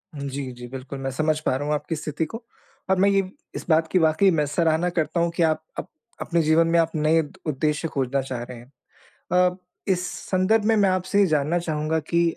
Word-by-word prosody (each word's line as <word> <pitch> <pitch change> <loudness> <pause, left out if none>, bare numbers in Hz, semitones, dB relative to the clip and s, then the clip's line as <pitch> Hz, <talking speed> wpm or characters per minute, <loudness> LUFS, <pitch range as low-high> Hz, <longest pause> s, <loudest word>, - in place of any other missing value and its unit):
जी, 140 -2 -4
जी, 120 0 -9
बिल्कुल, 135 +2 -7
मैं 135 0 -3
समझ 155 +3 0
पा - - +2
रहा 140 +2 -3
हूँ 150 - +1
आपकी 160 +2 -3
स्थिति 155 +1 -3
को, 225 +9 -8 0.5
और 190 - +3
मैं 200 +1 +5
ये 195 -1 +3 0.3
इस - - -5
बात 160 0 +4
की 185 - +4
वाक़ई 160 +4 +4
मैं 155 -3 +1
सराहना 160 +3 +1
करता 170 0 -1
हूँ 170 0 +2
कि 170 - +2
आप 160 -1 +2 0.2
अप - - -6 0.3
अपने 170 -1 +1
जीवन 160 +1 +3
में 170 0 +3
आप 165 0 +2
नए 155 +1 +3
द 150 - -10
उद्देश्य 150 +2 0
खोजना 135 -2 -1
चाह 130 -2 -5
रहे 125 0 -9
हैं। 120 +3 -15 0.6
अ, 180 0 +3 0.3
इस 180 -2 +1 0.2
संदर्भ 195 +4 +2
में 225 0 +4
मैं 200 -2 +4
आपसे 185 +2 0
ये 200 - +6
जानना 155 +1 +1
चाहूँगा 160 -1 -1
कि 170 +2 0
160 Hz, 225 wpm, -24 LUFS, 145-180 Hz, 0.6 s, ये